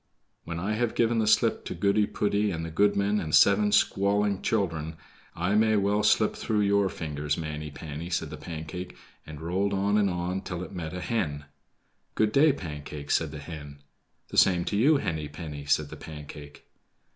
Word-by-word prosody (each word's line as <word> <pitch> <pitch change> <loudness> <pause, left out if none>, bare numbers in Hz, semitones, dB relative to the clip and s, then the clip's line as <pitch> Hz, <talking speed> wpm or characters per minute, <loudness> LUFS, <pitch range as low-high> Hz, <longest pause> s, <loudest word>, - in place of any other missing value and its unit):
"When 85 0 -4
I 100 +5 -1
have 115 +1 -1
given 115 0 +2
the 110 - +1
slip 110 +1 +3
to - - -5
Goody 100 +1 +2
poody, 105 0 0
and 80 -3 -3
the 80 - -6
goodman, 100 +3 +2
and 80 -4 0
seven 105 +1 +5
squalling 100 0 +2
children, 80 -7 -1 0.4
I 90 +4 0
may 110 +1 +4
well 100 +1 +2
slip 105 0 +3
through 110 -2 0
your 100 -1 +3
fingers, 75 -4 -3
Manny 75 -2 -5
panny," 75 +3 -7
said 80 -3 -2
the 75 - -6
Pancake, 80 +3 -7 0.3
and 75 -1 -8
rolled 95 +5 -1
on 100 +2 +2
and 100 -2 +2
on 90 +1 -2
till 90 -2 -5
it - - -9
met 85 -2 -5
a 90 - -4
hen. 80 -9 -2 0.7
"Good 110 -1 +2
day, 145 +6 +5
Pancake," 75 - -6
said 80 - +2
the 75 - -8
hen. 75 -1 -9 0.5
"The - - -6
same 90 -2 +5
to - - -2
you, 140 +9 +5
Henny 80 - -3
penny," 75 -1 -8
said 70 +1 +1
the - - -9
Pancake. 75 -1 -10
90 Hz, 185 wpm, -27 LUFS, 75-105 Hz, 0.7 s, seven